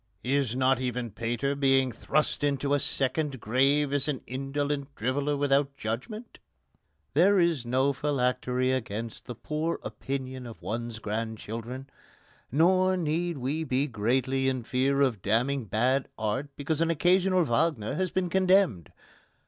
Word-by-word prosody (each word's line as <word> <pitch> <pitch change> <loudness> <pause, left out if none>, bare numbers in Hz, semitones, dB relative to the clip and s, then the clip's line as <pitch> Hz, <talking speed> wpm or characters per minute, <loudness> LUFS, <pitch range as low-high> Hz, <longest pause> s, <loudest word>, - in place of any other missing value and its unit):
Is 130 -2 +1
not 130 0 +2
even 125 -2 -3
Pater 120 +6 -2
being 135 -2 +3
thrust 150 +5 -1
into 140 0 +1
a 145 - +3
second 140 0 +1
grave 135 +6 +2
as 145 0 +1
an 145 -4 -2
indolent 140 +2 -3
driveller 140 +5 -1
without 140 0 +1
judgment? 175 - -5 0.7
There 190 +6 +5
is 165 -8 +1
no 130 +3 +2
phylactery 130 -2 0
against 115 -3 -4
the 125 - -7
poor 155 +7 -2
opinion 130 -2 -5
of 115 - -10
one's 115 +1 -4
grandchildren. 115 +3 -5 0.6
Nor 185 +6 +3
need 170 0 -1
we 140 +5 -2
be 135 -1 0
greatly 130 +3 0
in 130 -2 -2
fear 135 +3 +1
of 125 -8 +1
damning 120 +6 +1
bad 125 +6 +1
art 110 +6 -2
because 150 +2 -2
an 165 - +2
occasional 180 +3 +3
Wagner 120 -4 0
has 185 0 -1
been 185 +1 -1
condemned. 185 - +3
135 Hz, 140 wpm, -28 LUFS, 125-150 Hz, 0.7 s, There